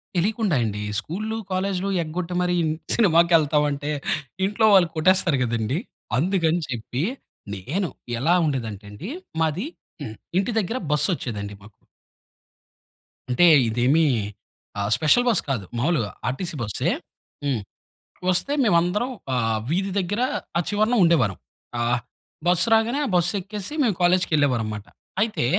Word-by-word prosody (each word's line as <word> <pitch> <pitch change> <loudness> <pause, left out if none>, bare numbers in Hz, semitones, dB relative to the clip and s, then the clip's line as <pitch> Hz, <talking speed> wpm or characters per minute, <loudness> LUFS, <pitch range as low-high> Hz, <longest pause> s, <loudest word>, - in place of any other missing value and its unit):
తెలియకుండా 205 0 +1
అండి. 105 -1 -3 0.2
స్కూల్లు, 215 - -4
కాలేజ్లు 190 +1 -1
ఎగ్గొట్టి 175 +3 -4
మరీ 180 0 +1
ఇన్ 155 - +1 0.2
సినిమాకెళ్తావంటే, 155 -6 +3 0.5
ఇంట్లో 210 +3 +1
వాళ్ళు 185 -4 +6
కొట్టేస్తారు 170 -2 +3
కదండి, 115 +3 -1 0.4
అందుకని 170 +1 +1
చెప్పి, 125 +4 -3 0.5
నేను 160 - -2 0.3
ఎలా 160 +8 +3
ఉండేదంటే 115 -8 -3
అండి, 170 - -7 0.3
మాది 160 - 0 0.3
హ్మ్, 110 -6 -6 0.2
ఇంటి 195 +5 +1
దగ్గర 220 +3 0
బస్సొచ్చేదండి 125 - -1
మాకు. 105 +2 -14 1.6
అంటే 125 +8 +4 0.2
ఇదేమీ 125 +8 +3 0.8
ఆహ్, 100 0 -1
స్పెషల్ 160 +11 +4
బస్ 215 -7 +3
కాదు. 125 -7 -1
మామూలుగా 125 - +1 0.2
ఆర్‌టిసీ 155 +7 -3
బస్సే 105 -5 0 0.5
హ్మ్. 130 -6 0 0.7
వస్తే 275 +10 +1
మేవందరం 190 +4 +2 0.2
ఆహ్, 115 -3 +1
వీధి 190 +4 0
దగ్గర, 205 +6 -1 0.4
ఆ - - +3
చివరన 215 +3 +2
ఉండేవారం. 140 - +3 0.4
ఆహ్, 120 +1 +1 0.5
బస్సు 180 +5 +3
రాగానే, 225 +5 +3
ఆ - - -1
బస్సెక్కేసి, 195 - -1
మేము 220 -7 +2
కాలేజ్‌కెళ్ళేవారం 150 -10 +2
మాట. 105 0 -8 0.4
అయితే, 215 - +1
165 Hz, 120 wpm, -24 LUFS, 125-195 Hz, 1.6 s, వాళ్ళు